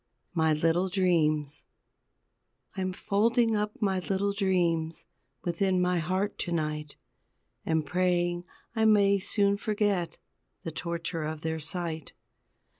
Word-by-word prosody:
MY 160 -2 +3
LITTLE 165 +4 +2
DREAMS 155 -6 +1 1.1
I'm 185 -1 -1
folding 225 +4 +2
up 210 0 -2
my 195 -4 +1
little 195 +2 -1
dreams 175 -5 0 0.4
Within 185 +2 +1
my 180 -1 +2
heart 185 +5 -1
to 175 - -3
night, 150 -2 -2 0.7
And 160 -1 +1
praying 175 +1 +1 0.3
I 220 - +2
may 200 -2 +5
soon 200 0 +2
forget 205 -5 0 0.5
The 165 - -4
torture 165 0 -3
of 155 0 -4
their 160 0 -2
sight. 160 0 -3
180 Hz, 115 wpm, -29 LUFS, 160-200 Hz, 1.1 s, may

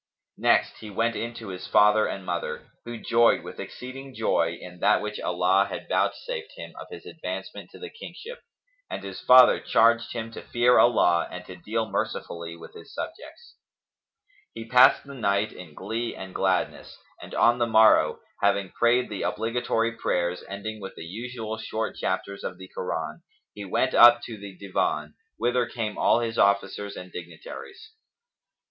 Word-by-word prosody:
Next - - +2
he 110 - -9
went 115 +3 0
in 115 0 -4
to 110 -4 -8
his 90 -1 -7
father 105 +1 +5
and 95 -1 -6
mother, 85 -1 -4
who 120 0 -6
joyed 115 +1 +3
with - - -9
exceeding 130 +1 -8
joy 85 -6 +1
in 90 0 -11
that - - +4
which 105 0 -5
Allah 90 +2 +2
had - - -6
vouchsafed 480 -3 -2
him - - -9
of - - -9
his - - -10
advancement - - -7
to - - -14
the 445 -1 -8
kingship, 465 +1 -10 0.5
and - - -5
his 95 -1 -7
father 125 0 +7
charged 115 +1 +3
him 115 -1 -5
to - - -8
fear 120 +1 +3
Allah 90 -8 +4
and 90 0 -8
to 90 - -9
deal 110 +5 -2
mercifully 85 -4 -4
with - - -12
his - - -13
subjects. - - -8 1.0
He 115 0 -7
passed 125 +2 +6
the 140 - -10
night 105 -4 0
in 80 -5 -12
glee 115 +5 -4
and 95 -1 -9
gladness, 95 -1 -1 0.2
and - - -9
on 120 +1 +4
the 120 - +2
morrow, 110 -1 +5 0.2
having 100 -1 +1
prayed 120 +1 +2
the 105 -3 -5
obligatory 115 +1 0
prayers 90 -6 -1
ending 105 +2 -6
with 95 - -8
the 80 - -8
usual 110 +3 -6
short 110 0 -3
chapters[FN#277] 100 +1 -3
of 90 - -15
the 95 0 -11
Koran, - - -4 0.3
he 105 -1 -8
went 130 +7 0
up 120 0 +8
to 115 - -6
the 100 -2 -10
Divan, 75 -6 -2 0.2
whither 120 +1 +1
came 110 -4 -4
all 120 - +4
his 115 -1 -2
officers 100 0 +1
and 90 0 -9
dignitaries. 85 - -10
110 Hz, 170 wpm, -26 LUFS, 95-120 Hz, 1.0 s, up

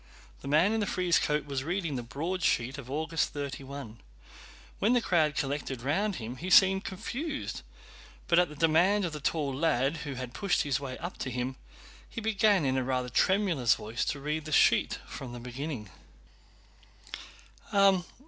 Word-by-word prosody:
The - - -8
man 155 +9 +4
in 225 - +1
the 205 - -1
frieze 180 -2 +2
coat 150 -1 0
was 140 -2 -3
reading 170 -2 -2
the 125 - -2
broadsheet 140 -1 -1
of 130 -2 -10
August 160 +3 -1
31. 140 -4 -6 0.8
When 220 +5 +3
the 245 - +4
crowd 160 -9 +2
collected 135 -3 -3
round 195 +9 0
him 120 -1 -6
he 180 +8 -5
seemed 190 +1 +6
confused, 280 - -4 0.7
but 170 - +5
at 180 - +3
the 150 - -10
demand 170 +6 +3
of 165 - -4
the 150 - -5
tall 145 -1 -1
lad 145 0 +1
who 145 -3 -5
had 125 -1 -6
pushed 200 +5 +1
his 140 -2 0
way 135 -2 -6
up 175 +3 -7
to 130 - -3
him, 125 +1 -3 0.5
he - - -6
began 210 -5 +3
in 130 0 +1
a 130 - +1
rather 125 -1 -1
tremulous 170 - +3
voice 110 +3 -3
to 145 - -2
read 150 +2 -3
the 155 - -6
sheet - - +4
from 125 -3 -8
the 120 - -7
beginning. 125 - -6
150 Hz, 170 wpm, -29 LUFS, 130-180 Hz, 0.8 s, seemed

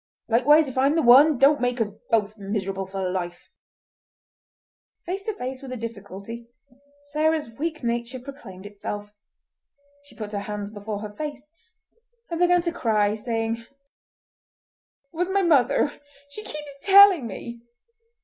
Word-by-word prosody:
Likewise, 290 +7 +5
if 260 -1 -3
I'm 275 +3 +3
the 325 - +2
one, 270 +5 +7
don't 280 +2 +4
make 245 0 0
us 215 -2 0 0.2
both 215 -2 +1
miserable 195 -2 -4
for 190 -1 -3
life!" 175 -1 -5 1.5
Face 375 +3 -3
to 435 - -2
face 260 -5 -5
with 270 -2 -9
a 255 - -4
difficulty, 230 0 -8 0.6
Sarah's 310 -3 0
weak 310 +5 -4
nature 235 +2 -2
proclaimed 245 -8 -11
itself; 205 0 -7 0.9
she 285 - -16
put 215 -3 -7
her 205 - -2
hands 205 0 -6
before 205 0 -5
her 210 -1 -7
face 295 +3 -7 0.8
and 335 - -2
began 355 0 +4
to 340 - -1
cry, 215 -9 +1
saying— 225 0 -2
"It 230 - -16 1.5
was 355 +3 -1
my 395 0 +2
mother. 285 -3 +2 0.3
She 425 +9 -8
keeps 295 -4 -7
telling 390 - +7
me!" 235 +3 -8
240 Hz, 140 wpm, -24 LUFS, 210-300 Hz, 1.5 s, one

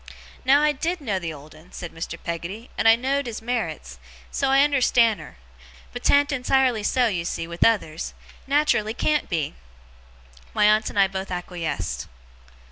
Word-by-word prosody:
Now 280 +3 +5
I 300 - +4
DID 335 +5 -2
know 210 -10 -2
the 170 -2 -4
old 150 0 -12
'un,' 155 +3 -17
said 175 - -7
Mr. 165 0 -6
Peggotty, 175 +7 -5
'and - - +1
I 225 - +8
know'd 270 +3 -1
his 230 -2 -5
merits, 165 - -4 0.3
so 275 - 0
I 270 - +4
unnerstan' 245 - +3
her; 155 - -12 0.6
but - - -6
'tan't 285 +1 +4
entirely 260 -3 +2
so, 245 +4 +2
you 185 -7 0
see, 170 - -3
with 170 +1 -1
others 180 -8 0 0.3
nat'rally 275 -7 +2
can't 300 +3 0
be!' 160 -4 -1 1.0
My - - +4
aunt 215 +1 +4
and - - -9
I 195 -1 +5
both 190 0 -5
acquiesced. 175 - -4
215 Hz, 170 wpm, -24 LUFS, 170-265 Hz, 1.0 s, I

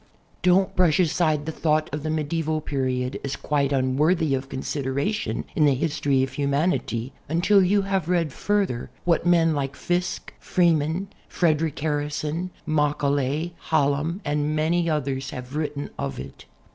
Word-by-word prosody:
Don't 190 +2 +3
brush 180 -4 +3
aside 155 -3 +2
the 160 - -2
thought 155 -1 +1
of 150 - -2
the 155 - -3
medieval 155 0 -1
period 130 -3 -2
as 140 0 -2
(|uite 140 -1 0
unworthy 145 +4 +2
of 135 0 -2
consideration 140 +9 -2
in 155 - +4
the 140 -2 +4
history 140 -2 +1
of 130 - -3
humanity 140 -3 0 0.2
until 180 +5 +4
you 200 +2 +3
have 195 -4 -1
read 170 -6 +1
further 200 -12 -1 0.2
what 170 0 +2
men 165 -2 +4
like 140 -1 -2
Fiske, 180 +2 -2
Freeman, 170 +1 +1 0.2
Frederic 160 -3 +1
Harrison, 150 +3 -2 0.2
Macaulay, 150 +1 0 0.2
Hallam 145 +6 +1
and 150 +1 0
many 165 +2 +1
others 140 -3 -1
have 125 -1 -7
wrtten 145 -1 -3
of 70 -1 -3
it. - - -9
150 Hz, 145 wpm, -24 LUFS, 140-170 Hz, 0.2 s, in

